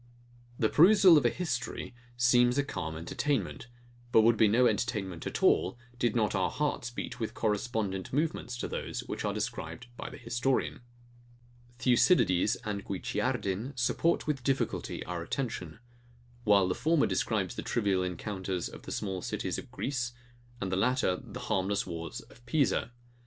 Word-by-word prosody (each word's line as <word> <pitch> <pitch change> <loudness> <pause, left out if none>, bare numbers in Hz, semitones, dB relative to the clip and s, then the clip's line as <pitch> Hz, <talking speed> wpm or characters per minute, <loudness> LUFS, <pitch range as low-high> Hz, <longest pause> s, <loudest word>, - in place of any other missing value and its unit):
The 110 - +3
perusal 185 - +7
of 150 - +5
a - - +4
history 130 -6 -3 0.2
seems 120 +1 +4
a 140 - +3
calm 80 - -4
entertainment; 115 - -2 0.4
but 110 - +7
would 115 +1 +5
be 110 0 +5
no 120 +5 +4
entertainment 105 -10 -1
at - - -4
all, 95 +6 +3 0.2
did 120 -2 +1
not 110 -3 +2
our 95 -2 +1
hearts 145 -5 -1
beat 120 - -6
with 110 - -3
correspondent 105 -3 -1
movements 145 -4 -1
to - - -3
those - - -4
which - - -5
are - - 0
described 80 +9 -4
by - - -5
the - - -10
historian. 120 +3 -1 1.0
Thucydides 120 - +4
and 100 -2 -3
Guicciardin 100 +5 -2
support 165 +7 +1
with 145 -4 -2
difficulty 135 0 -1
our 90 -1 -4
attention; 90 -5 -4 0.7
while 100 -3 +5
the 90 - +1
former 160 - +2
describes - - 0
the - - -5
trivial 100 -5 +1
encounters 95 0 -3
of - - -11
the - - -8
small 95 -3 -3
cities - - -3
of - - -11
Greece, 125 -3 -3 0.5
and 95 -3 -3
the 95 - +1
latter 120 -3 +2
the - - -8
harmless 95 +1 0
wars 85 -2 -6
of 120 - -19
Pisa. 145 -7 +1
115 Hz, 155 wpm, -30 LUFS, 95-130 Hz, 1.0 s, perusal